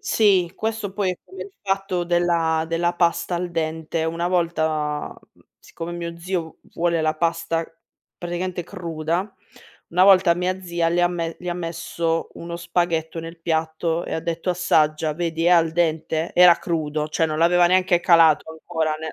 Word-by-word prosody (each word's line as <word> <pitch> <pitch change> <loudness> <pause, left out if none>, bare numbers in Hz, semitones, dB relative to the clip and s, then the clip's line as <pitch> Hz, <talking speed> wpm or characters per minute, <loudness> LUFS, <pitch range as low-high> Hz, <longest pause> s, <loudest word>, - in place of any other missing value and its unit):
Sì, 190 -5 +2
questo 220 -3 -3
poi 195 -2 0
è 180 - -6
come 380 - -9
il 400 - -13
fatto 195 -2 -1
della 170 -2 +1
della 170 +1 0
pasta 175 +1 +1
al 180 0 -3
dente, 160 0 -2
una 165 +1 -2
volta, 160 -4 0 0.2
mhmm, - - -26 0.2
siccome 170 +1 -8
mio 170 -1 -6
zio 170 -2 -4
v - - -23
vuole 170 -1 +1
la 155 0 +1
pasta 165 0 -1 0.5
praticamente 175 0 -4
cruda, 170 +1 -3 0.6
una 180 +2 +3
volta 185 -3 +6
mia 185 +2 -2
zia 170 -2 -1
le 175 +1 +1
ha 175 - +4
me 165 -2 -4
gli 180 - -7
ha 175 - -1
messo 165 -1 -3
uno 170 0 -6
spaghetto 170 -1 -1
nel 165 +1 -9
piatto 160 +1 -1
e - - -4
ha - - -2
detto: 170 +2 -2
"Assaggia. 155 -3 +1
Vedi 165 0 -2
è 175 - +4
al 165 -2 +4
dente?". 160 -1 -1
Era 180 -1 +8
crudo. 155 -3 -2
Cioè 160 +1 +1
non 155 -1 -3
l'aveva 175 +1 +4
neanche 185 -1 +3
calato 165 -3 +4
ancora 160 -1 -2
nel 160 0 -6
170 Hz, 175 wpm, -22 LUFS, 160-175 Hz, 0.6 s, Era